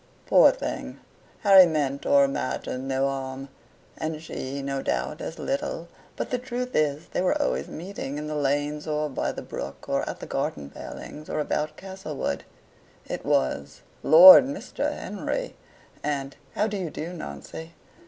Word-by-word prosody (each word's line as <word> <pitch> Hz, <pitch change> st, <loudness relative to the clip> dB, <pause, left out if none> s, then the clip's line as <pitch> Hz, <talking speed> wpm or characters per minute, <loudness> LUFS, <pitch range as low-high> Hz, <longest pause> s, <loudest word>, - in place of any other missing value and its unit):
Poor -, -, +7 dB
thing, -, -, -4 dB, 0.4 s
Harry 195 Hz, -3 st, +8 dB
meant 145 Hz, -4 st, -1 dB
or 140 Hz, 0 st, +6 dB
imagined 135 Hz, -1 st, -2 dB
no 135 Hz, 0 st, +1 dB
harm; 135 Hz, 0 st, -5 dB, 0.5 s
and 155 Hz, -1 st, -4 dB
she, 140 Hz, -3 st, -5 dB
no 135 Hz, 0 st, -2 dB
doubt, 60 Hz, -, -2 dB
as 165 Hz, -, -6 dB
little, 275 Hz, -, -3 dB, 0.3 s
but -, -, -4 dB
the 250 Hz, -, 0 dB
truth 250 Hz, 0 st, -4 dB
is 150 Hz, +1 st, +1 dB
they -, -, -1 dB
were 185 Hz, -, +1 dB
always 65 Hz, +2 st, 0 dB
meeting 160 Hz, -5 st, -6 dB
in 150 Hz, -, -4 dB
the 150 Hz, -, -4 dB
lanes, 145 Hz, +1 st, -1 dB
or 150 Hz, 0 st, 0 dB
by 135 Hz, -, -2 dB
the -, -, -7 dB
brook, -, -, -7 dB
or -, -, +1 dB
at -, -, -6 dB
the -, -, -7 dB
garden 70 Hz, -1 st, -3 dB
palings, 155 Hz, +1 st, -9 dB
or -, -, -2 dB
about 150 Hz, 0 st, -2 dB
Castlewood: 190 Hz, -6 st, -4 dB, 0.6 s
it -, -, -5 dB
was, 70 Hz, +2 st, 0 dB, 0.2 s
"Lord, 180 Hz, +9 st, +10 dB
Mr. 280 Hz, +1 st, -3 dB
Henry!" -, -, -4 dB, 0.5 s
and 140 Hz, -2 st, -2 dB, 0.2 s
"how 210 Hz, -, +2 dB
do 210 Hz, -2 st, -2 dB
you 180 Hz, -4 st, -3 dB
do, 165 Hz, +4 st, -6 dB
Nancy?" 160 Hz, -, -8 dB
150 Hz, 160 wpm, -26 LUFS, 135-180 Hz, 0.6 s, Lord